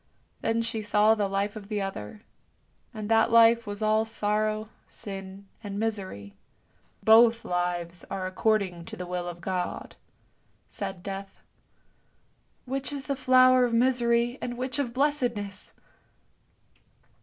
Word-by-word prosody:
Then 230 Hz, +1 st, 0 dB
she 230 Hz, -1 st, -3 dB
saw 210 Hz, +1 st, +4 dB
the 210 Hz, -2 st, 0 dB
life 200 Hz, +2 st, -2 dB
of 205 Hz, -2 st, -9 dB
the 210 Hz, -2 st, -1 dB
other, 195 Hz, -, -6 dB, 0.7 s
and 215 Hz, -3 st, -6 dB
that 225 Hz, 0 st, +4 dB
life 230 Hz, 0 st, +6 dB
was 205 Hz, +1 st, -4 dB
all 215 Hz, +1 st, +3 dB
sorrow, 215 Hz, 0 st, -1 dB, 0.2 s
sin, 195 Hz, 0 st, -8 dB, 0.2 s
and 200 Hz, -1 st, -5 dB
misery. 190 Hz, -, -4 dB, 0.4 s
" -, -, -36 dB
Both 230 Hz, +1 st, +6 dB
lives 175 Hz, -1 st, -2 dB
are 195 Hz, -1 st, -4 dB
according 185 Hz, -3 st, 0 dB
to -, -, -8 dB
the 180 Hz, -, -5 dB
will 180 Hz, 0 st, -4 dB
of 175 Hz, 0 st, -7 dB
God! 180 Hz, 0 st, -4 dB, 0.4 s
" -, -, -43 dB, 0.3 s
said 195 Hz, -3 st, -6 dB
Death. 195 Hz, 0 st, -7 dB, 0.6 s
" -, -, -42 dB
Which 270 Hz, +2 st, -4 dB
is 280 Hz, -1 st, -5 dB
the 280 Hz, -, -1 dB
flower 255 Hz, -1 st, +5 dB
of 240 Hz, -1 st, 0 dB
misery 240 Hz, 0 st, +2 dB
and 240 Hz, 0 st, -4 dB
which 255 Hz, +2 st, -3 dB
of 260 Hz, -4 st, -1 dB
blessedness? 245 Hz, -7 st, -1 dB
215 Hz, 145 wpm, -27 LUFS, 195-235 Hz, 0.7 s, life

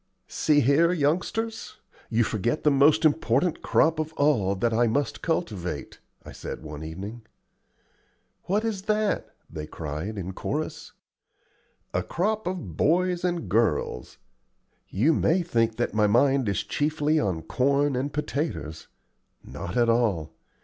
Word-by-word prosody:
"See 145 Hz, -1 st, +2 dB
here, 145 Hz, +7 st, +4 dB
youngsters, 185 Hz, +9 st, -1 dB, 0.3 s
you 120 Hz, 0 st, +2 dB
forget 115 Hz, +6 st, -1 dB
the 150 Hz, -, +4 dB
most 150 Hz, +4 st, +4 dB
important 150 Hz, +1 st, +2 dB
crop 160 Hz, 0 st, +2 dB
of 155 Hz, 0 st, -3 dB
all 125 Hz, -11 st, +2 dB
that 115 Hz, +4 st, 0 dB
I 120 Hz, +1 st, +3 dB
must 140 Hz, +6 st, -1 dB
cultivate," 105 Hz, -, -3 dB, 0.3 s
I -, -, -9 dB
said -, -, -7 dB
one 75 Hz, 0 st, -7 dB
evening. 100 Hz, +9 st, -7 dB, 1.2 s
"What 210 Hz, +4 st, 0 dB
is 215 Hz, -4 st, -2 dB
that?" 215 Hz, -1 st, +1 dB, 0.2 s
they 75 Hz, -1 st, -7 dB
cried 80 Hz, +8 st, -5 dB
in 95 Hz, -1 st, -4 dB
chorus. -, -, -4 dB, 1.0 s
"A -, -, +1 dB
crop 215 Hz, +4 st, -1 dB
of 170 Hz, -, -4 dB
boys 180 Hz, -, +2 dB
and 175 Hz, -2 st, -1 dB
girls. 105 Hz, -, 0 dB, 0.7 s
You 130 Hz, +12 st, +2 dB
may 175 Hz, +4 st, +2 dB
think 115 Hz, -8 st, +1 dB
that 120 Hz, -, -1 dB
my 105 Hz, -1 st, +3 dB
mind 130 Hz, +2 st, +3 dB
is 100 Hz, -, -1 dB
chiefly 150 Hz, +1 st, 0 dB
on 90 Hz, -, -1 dB
corn 140 Hz, -, +1 dB
and 135 Hz, +3 st, -2 dB
potatoes. 145 Hz, -, -3 dB, 0.6 s
Not 90 Hz, -, -6 dB
at 120 Hz, -1 st, +4 dB
all. 105 Hz, -10 st, +1 dB
135 Hz, 135 wpm, -26 LUFS, 100-160 Hz, 1.2 s, here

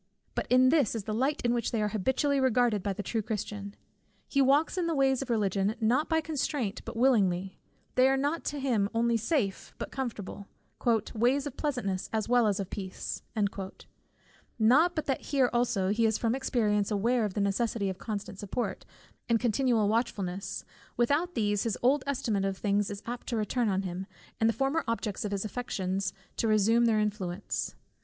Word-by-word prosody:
But -, -, -2 dB
this 255 Hz, 0 st, +4 dB
is 220 Hz, -, -3 dB
the 215 Hz, -, -3 dB
light 270 Hz, +7 st, 0 dB
in 240 Hz, 0 st, +2 dB
which 235 Hz, -2 st, 0 dB
they 230 Hz, -, -1 dB
are 210 Hz, 0 st, +1 dB
habitually 265 Hz, +7 st, +1 dB
regarded 245 Hz, -5 st, +3 dB
by 200 Hz, -, -1 dB
the 200 Hz, +1 st, -4 dB
true 225 Hz, +3 st, -1 dB
Christian. 205 Hz, -1 st, -5 dB, 0.5 s
He 275 Hz, -, +2 dB
walks 280 Hz, +6 st, +3 dB
in 360 Hz, -2 st, 0 dB
the 330 Hz, -, 0 dB
ways 270 Hz, -2 st, +3 dB
of 270 Hz, -, -5 dB
Religion, 205 Hz, -2 st, +1 dB
not 245 Hz, +7 st, +2 dB
by 320 Hz, -1 st, +2 dB
constraint, 290 Hz, -8 st, -2 dB
but -, -, -6 dB
willingly; 195 Hz, -7 st, +2 dB, 0.3 s
they 255 Hz, +1 st, +5 dB
are 270 Hz, -, +2 dB
to 290 Hz, +1 st, -1 dB
him 245 Hz, -7 st, +1 dB
not 200 Hz, -, -5 dB
only 235 Hz, 0 st, +2 dB
safe, 225 Hz, -, -1 dB
but -, -, -5 dB
comfortable; 210 Hz, -6 st, -5 dB, 0.7 s
"ways 250 Hz, +5 st, +2 dB
of 285 Hz, -3 st, -5 dB
pleasantness 240 Hz, -11 st, -2 dB
as 220 Hz, -1 st, -1 dB
well 240 Hz, -1 st, +4 dB
as 205 Hz, -1 st, +1 dB
of 195 Hz, -1 st, -4 dB
peace." 190 Hz, -2 st, -5 dB, 1.4 s
Not 275 Hz, +11 st, +4 dB
but 310 Hz, -, -1 dB
that 270 Hz, -, -1 dB
here 265 Hz, -3 st, +1 dB
also 225 Hz, -6 st, +1 dB
he 225 Hz, +2 st, +3 dB
is 220 Hz, -, +1 dB
from 230 Hz, -1 st, 0 dB
experience 215 Hz, -6 st, +1 dB
aware 230 Hz, +3 st, +1 dB
of 205 Hz, -3 st, -2 dB
the -, -, 0 dB
necessity 200 Hz, +1 st, 0 dB
of 190 Hz, 0 st, -4 dB
constant 205 Hz, -3 st, -5 dB
support, 210 Hz, +4 st, -3 dB, 0.4 s
and 230 Hz, -1 st, +4 dB
continual 240 Hz, -2 st, +2 dB
watchfulness; 200 Hz, -4 st, -2 dB, 0.3 s
without 290 Hz, +9 st, +1 dB
these, 205 Hz, -3 st, +1 dB
his 225 Hz, -3 st, -1 dB
old 265 Hz, +3 st, +4 dB
estimate 225 Hz, -7 st, 0 dB
of 195 Hz, -1 st, -1 dB
things 205 Hz, 0 st, +1 dB
is 205 Hz, 0 st, -7 dB
apt 240 Hz, +1 st, -6 dB
to 235 Hz, -, -1 dB
return 220 Hz, +2 st, 0 dB
on 190 Hz, 0 st, 0 dB
him, 185 Hz, +1 st, -5 dB, 0.3 s
and 225 Hz, -, +4 dB
the -, -, +2 dB
former 270 Hz, +8 st, 0 dB
objects 225 Hz, -3 st, -2 dB
of 205 Hz, -, -3 dB
his 200 Hz, +1 st, -2 dB
affections 195 Hz, -4 st, -2 dB, 0.3 s
to 230 Hz, -, +1 dB
resume 220 Hz, +2 st, +4 dB
their 220 Hz, -2 st, +3 dB
influence. 205 Hz, -3 st, -2 dB
225 Hz, 185 wpm, -29 LUFS, 205-260 Hz, 1.4 s, they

